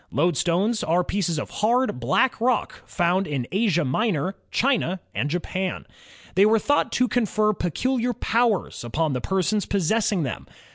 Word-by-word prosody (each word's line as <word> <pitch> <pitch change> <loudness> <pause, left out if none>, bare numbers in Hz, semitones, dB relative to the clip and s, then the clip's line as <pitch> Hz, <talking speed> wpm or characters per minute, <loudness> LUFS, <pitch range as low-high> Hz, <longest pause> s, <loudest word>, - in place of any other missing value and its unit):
Loadstones 175 - +1
are 175 +3 +2
pieces 175 -4 -1
of - - -4
hard, 235 - +2
black 225 - +1
rock 250 +1 0
found 180 +2 +1
in 135 -5 -2
Asia 190 -5 +1
Minor, 185 - 0 0.2
China, 225 -8 +1
and 145 - -1
Japan. 180 +3 -3 0.5
They 190 - +4
were 225 +1 +4
thought 290 +6 +1
to 250 - +2
confer 215 -2 +1
peculiar 245 - -1
powers 230 - 0
upon 150 +5 -1
the 125 - -2
persons 190 - 0
possessing 200 -1 +1
them. 130 - -5
190 Hz, 145 wpm, -24 LUFS, 165-225 Hz, 0.5 s, They